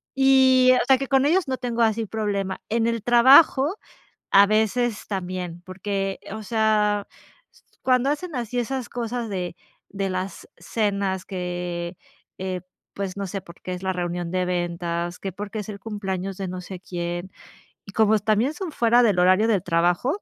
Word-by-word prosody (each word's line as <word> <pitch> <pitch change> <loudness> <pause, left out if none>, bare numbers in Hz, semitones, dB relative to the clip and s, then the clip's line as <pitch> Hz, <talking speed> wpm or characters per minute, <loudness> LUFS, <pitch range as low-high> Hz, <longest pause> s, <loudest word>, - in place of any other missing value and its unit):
y 260 -1 +5
o - - 0
sea, 265 -1 +5
que 275 - -3
con 270 0 +3
ellos 335 +1 +2
no 260 - -1
tengo 235 -2 -2
así 225 0 +1
problema, 200 -3 -2
en 230 +1 +1
el 230 -1 -1
trabajo, 265 - +6 0.5
a 200 0 +7
veces 220 +2 +1
también, 180 -3 -4
porque, 195 +1 -3
o 220 - -6
sea, 210 -1 +1 0.8
cuando 255 +1 +3
hacen 300 +1 -3
así 245 0 -3
esas 255 +1 -3
cosas 235 -1 -3
de 180 -3 -4 0.3
de 195 -1 -3
las 185 +1 -5
cenas 195 0 -1
que, 175 -1 -4 0.4
eh, 185 -1 -3 0.3
pues, 195 -2 -4
no 200 - -3
sé, 195 +2 -4
por 170 0 -15
qué 185 - -6
es 180 - -6
la 190 0 0
reunión 175 -1 -3
de 185 0 0
ventas, 175 -1 -2
que 195 - -4
porque 205 +3 -6
es 210 - -6
el 200 -1 -7
cumpleaños 195 -3 -4
de 195 -1 -4
no 180 0 -5
sé 180 0 -8
quién 175 +1 -5 0.5
y 200 - -11
como 220 -1 +4
también 215 +7 +1
son 355 -1 -5
fuera 240 +1 +4
del 205 -6 +3
horario 185 +5 +4
del 200 -6 +1
trabajo, 175 - +1
200 Hz, 170 wpm, -24 LUFS, 185-235 Hz, 0.8 s, a